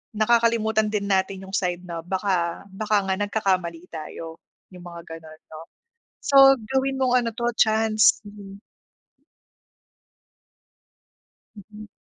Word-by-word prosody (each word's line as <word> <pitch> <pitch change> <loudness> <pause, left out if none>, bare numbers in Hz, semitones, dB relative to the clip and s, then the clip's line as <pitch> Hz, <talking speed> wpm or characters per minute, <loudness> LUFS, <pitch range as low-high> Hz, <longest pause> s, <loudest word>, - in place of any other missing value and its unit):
nakakalimutan 220 -1 +2
din 200 -2 -2
natin 190 0 -1
yung 195 - -5
side 180 -1 -1
na, 170 -1 -5
baka 185 -2 -2
baka 210 +1 0
nga 190 - 0
nagkakamali 185 -5 -1
tayo, 160 0 -8 0.3
yung 180 -1 -13
mga 170 -1 -9 0.2
ganon, 155 -1 -15
no? 155 +1 -9 0.6
So, 270 -1 +6
gawin 265 +4 -2
mong 250 -1 +2
ano 230 - -2
'to 240 0 -1
chance, 220 0 +3
mhm. 200 -1 -12 3.0
Mhm. 210 +1 -13
205 Hz, 115 wpm, -23 LUFS, 180-220 Hz, 3.0 s, So